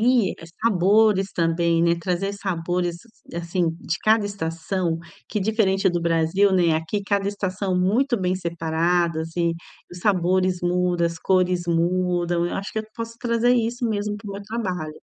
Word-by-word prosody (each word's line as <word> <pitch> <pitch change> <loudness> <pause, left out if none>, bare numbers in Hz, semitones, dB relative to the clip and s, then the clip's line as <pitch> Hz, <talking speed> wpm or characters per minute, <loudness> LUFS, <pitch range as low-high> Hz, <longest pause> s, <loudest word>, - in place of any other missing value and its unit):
E, 235 -4 +3 0.3
sabores 200 0 +3
também, 165 0 +1
né, 170 0 +3
trazer 185 +3 -1
sabores, 175 -2 -2 0.4
assim, 170 0 -1
de 165 - -2
cada 215 -1 +4
estação, 170 -2 -2 0.3
que, 210 - -2
diferente 195 -2 +2
do 175 - -1
Brasil, 170 +4 +2
né, 175 -4 +3
aqui 165 +6 -3
cada 200 -1 0
estação, 190 -2 -2
muito 240 +8 +2
bem 180 0 0
separadas 165 -1 0
e 170 -1 +1 0.4
os 175 - -9
sabores 185 -2 +2
muda, 175 -1 +1
as 170 -1 -5
cores 185 -1 +2
mudam, 175 0 +1
eu - - -4
acho 195 +1 -5
que - - -2
eu 215 - -9
posso 230 0 -6
trazer 240 0 +2
isso, 240 +1 -1
mesmo, 210 -1 -1
para 210 0 -9
o 200 - -5
meu 200 - -6
trabalho. 185 -8 -3
185 Hz, 160 wpm, -23 LUFS, 170-205 Hz, 0.4 s, cada